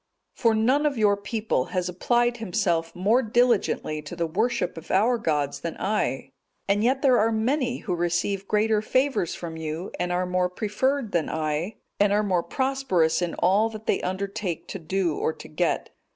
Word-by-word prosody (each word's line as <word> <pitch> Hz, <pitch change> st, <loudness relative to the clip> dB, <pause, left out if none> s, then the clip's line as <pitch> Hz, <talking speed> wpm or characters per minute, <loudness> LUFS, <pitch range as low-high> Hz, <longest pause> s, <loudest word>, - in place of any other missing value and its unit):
For 230 Hz, -3 st, +2 dB
none 260 Hz, +7 st, +3 dB
of 280 Hz, -4 st, -2 dB
your 210 Hz, -2 st, +4 dB
people 205 Hz, -, -1 dB
has 180 Hz, -1 st, -2 dB
applied 240 Hz, +7 st, +1 dB
himself 175 Hz, -6 st, -1 dB
more 210 Hz, +8 st, +3 dB
diligently 230 Hz, -9 st, +1 dB
to 150 Hz, +3 st, -8 dB
the 170 Hz, -1 st, -1 dB
worship 215 Hz, +10 st, -1 dB
of 165 Hz, -, -10 dB
our 230 Hz, +5 st, +3 dB
gods 150 Hz, -7 st, -1 dB
than 170 Hz, -, -5 dB
I; 190 Hz, -10 st, -1 dB, 0.4 s
and 200 Hz, +2 st, +2 dB
yet 260 Hz, +4 st, +1 dB
there 255 Hz, -3 st, +5 dB
are 225 Hz, +2 st, +3 dB
many 245 Hz, +3 st, 0 dB
who 185 Hz, -, -2 dB
receive 175 Hz, +3 st, -1 dB
greater 215 Hz, 0 st, +2 dB
favours 260 Hz, -, 0 dB
from 165 Hz, -2 st, -6 dB
you, 160 Hz, +3 st, -5 dB
and 180 Hz, 0 st, -1 dB
are 180 Hz, +1 st, 0 dB
more 180 Hz, 0 st, 0 dB
preferred 220 Hz, +6 st, -1 dB
than 170 Hz, -2 st, 0 dB
I, 155 Hz, +6 st, -2 dB, 0.2 s
and 205 Hz, 0 st, +4 dB
are 210 Hz, +1 st, +3 dB
more 185 Hz, -4 st, +1 dB
prosperous 260 Hz, -, +1 dB
in 175 Hz, -1 st, -2 dB
all 200 Hz, +5 st, +3 dB
that 220 Hz, -1 st, -9 dB
they -, -, +1 dB
undertake 190 Hz, -2 st, -3 dB
to 195 Hz, -, -5 dB
do 175 Hz, -1 st, -1 dB
or 160 Hz, -, 0 dB
to -, -, -11 dB
get. 165 Hz, +2 st, -1 dB
200 Hz, 180 wpm, -25 LUFS, 175-225 Hz, 0.4 s, there